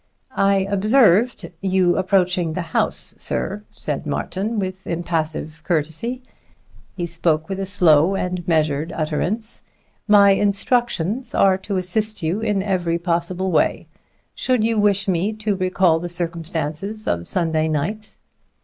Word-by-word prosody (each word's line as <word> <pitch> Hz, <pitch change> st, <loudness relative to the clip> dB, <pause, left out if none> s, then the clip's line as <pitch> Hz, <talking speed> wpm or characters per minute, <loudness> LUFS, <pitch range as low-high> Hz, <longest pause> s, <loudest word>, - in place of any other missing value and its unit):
"I 195 Hz, 0 st, +3 dB
observed 210 Hz, -1 st, +3 dB
you 185 Hz, -2 st, +2 dB
approaching 185 Hz, -3 st, +1 dB
the 180 Hz, -, -3 dB
house, -, -, 0 dB
sir," 205 Hz, +2 st, -2 dB
said -, -, -5 dB
Martin 210 Hz, +4 st, -3 dB
with 190 Hz, -1 st, -4 dB
impassive 160 Hz, -2 st, -3 dB
courtesy. 175 Hz, -, -1 dB, 0.7 s
He 175 Hz, -, -2 dB
spoke 165 Hz, -2 st, 0 dB
with 195 Hz, 0 st, -4 dB
a 195 Hz, -, -2 dB
slow 180 Hz, -2 st, +4 dB
and 180 Hz, -2 st, -3 dB
measured 155 Hz, -1 st, +1 dB
utterance. 175 Hz, +9 st, -2 dB, 0.5 s
"My 200 Hz, -1 st, +6 dB
instructions 205 Hz, +2 st, 0 dB
are 195 Hz, -1 st, +4 dB
to 195 Hz, 0 st, -3 dB
assist 210 Hz, +3 st, -1 dB
you 165 Hz, +6 st, 0 dB
in 210 Hz, -3 st, 0 dB
every 175 Hz, -4 st, 0 dB
possible 175 Hz, +2 st, -1 dB
way. 160 Hz, -, +1 dB, 0.5 s
Should 250 Hz, -4 st, 0 dB
you 225 Hz, -1 st, +1 dB
wish 200 Hz, -1 st, +2 dB
me 190 Hz, +3 st, 0 dB
to 215 Hz, -1 st, -2 dB
recall 185 Hz, -3 st, +2 dB
the 175 Hz, +1 st, -5 dB
circumstances 170 Hz, +3 st, -3 dB
of 85 Hz, 0 st, -1 dB
Sunday 160 Hz, -3 st, 0 dB
night?" 175 Hz, +8 st, -3 dB
185 Hz, 130 wpm, -21 LUFS, 165-205 Hz, 0.7 s, My